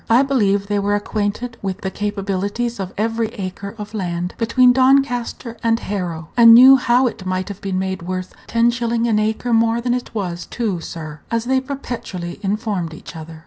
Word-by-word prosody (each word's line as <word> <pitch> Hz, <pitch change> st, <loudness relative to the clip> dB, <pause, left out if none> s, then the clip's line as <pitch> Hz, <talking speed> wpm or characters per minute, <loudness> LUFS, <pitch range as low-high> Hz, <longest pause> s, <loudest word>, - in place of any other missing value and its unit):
I 235 Hz, +4 st, +5 dB
believe 205 Hz, -8 st, +1 dB
they 205 Hz, 0 st, 0 dB
were 205 Hz, +1 st, +1 dB
acquainted 215 Hz, +3 st, -3 dB
with 195 Hz, 0 st, -4 dB
the 190 Hz, -, -3 dB
capabilities 205 Hz, +3 st, -2 dB
of 190 Hz, -1 st, -4 dB
every 225 Hz, +1 st, 0 dB
acre 200 Hz, 0 st, -6 dB
of 210 Hz, 0 st, -8 dB
land 180 Hz, -3 st, -3 dB
between 245 Hz, +2 st, +4 dB
Doncaster 255 Hz, -3 st, +1 dB
and 230 Hz, 0 st, +2 dB
Harrow, 175 Hz, -7 st, -4 dB
and 230 Hz, -1 st, +9 dB
knew 260 Hz, +3 st, +9 dB
how 250 Hz, +1 st, +3 dB
it 225 Hz, -5 st, -3 dB
might 185 Hz, +1 st, -2 dB
have 200 Hz, -1 st, -8 dB
been 195 Hz, -1 st, -2 dB
made 190 Hz, -1 st, -2 dB
"worth 185 Hz, +1 st, -5 dB
ten 230 Hz, +1 st, +3 dB
shillin' 235 Hz, -1 st, -1 dB
an 220 Hz, -2 st, +2 dB
acre 220 Hz, +3 st, -1 dB
more 230 Hz, +1 st, +3 dB
than 245 Hz, 0 st, 0 dB
it 245 Hz, -2 st, -4 dB
was, 180 Hz, -4 st, -3 dB
too, 215 Hz, -7 st, -2 dB
sir," 155 Hz, -2 st, -7 dB
as 230 Hz, 0 st, -1 dB
they 260 Hz, +1 st, +2 dB
perpetually 245 Hz, -10 st, -6 dB
informed 200 Hz, -5 st, -2 dB
each 160 Hz, -, -11 dB
other. 160 Hz, 0 st, -9 dB
210 Hz, 185 wpm, -20 LUFS, 190-235 Hz, -, and